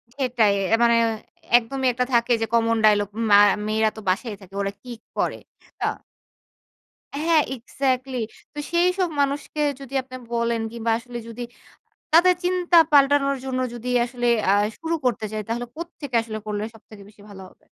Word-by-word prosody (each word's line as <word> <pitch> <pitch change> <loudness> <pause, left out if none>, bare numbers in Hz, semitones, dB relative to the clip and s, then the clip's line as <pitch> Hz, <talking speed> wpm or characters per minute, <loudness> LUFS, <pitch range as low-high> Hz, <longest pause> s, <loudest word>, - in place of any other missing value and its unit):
সেটাই। 245 -6 +2 0.3
মানে 235 0 +5 0.6
একদমই 260 +3 -2
একটা 250 +1 0
থাকে 235 +1 +2
যে - - +2
কমন 230 0 +3
ডায়লগ 205 -1 +4 0.2
মা 205 - +9 0.3
মেয়েরা 220 0 +2
তো - - -5
বাসায়ই 205 +2 -2
থাকে। 190 0 -16
ওরা 195 - -1
কি 250 - -10 0.3
করে? - - -1 0.4
না? - - +1 1.4
হ্যাঁ, 325 -1 +4
এক্সাক্টলি। 260 +1 -2 0.4
তো 295 - -6
সেইসব 360 +2 +2
মানুষকে 285 +2 -2 0.2
যদি 275 -1 -11
আপনি 255 0 -11 0.2
বলেন। 235 -1 0
কিংবা 230 -1 -2
আসলে 240 0 -8
যদি 230 +1 -8 0.7
তাদের 360 +2 +6
চিন্তা 355 -1 +2
পাল্টানোর 275 -1 +4
জন্য 260 -1 -2
যদি 240 +1 -8 0.2
আসলে 245 0 -3 0.2
আ - - +5 0.3
শুরু 330 0 -1
করতে 235 -3 0
চায় 215 -1 -3
তাহলে 240 +1 -2
কোত্থেকে 310 -6 -7
আসলে 220 -1 -6
করলে 210 0 -2
সবথেকে 215 -2 -15
বেশি 205 -1 -20
ভালো 195 -2 -11
হবে? - - -27
245 Hz, 155 wpm, -23 LUFS, 225-280 Hz, 1.4 s, মা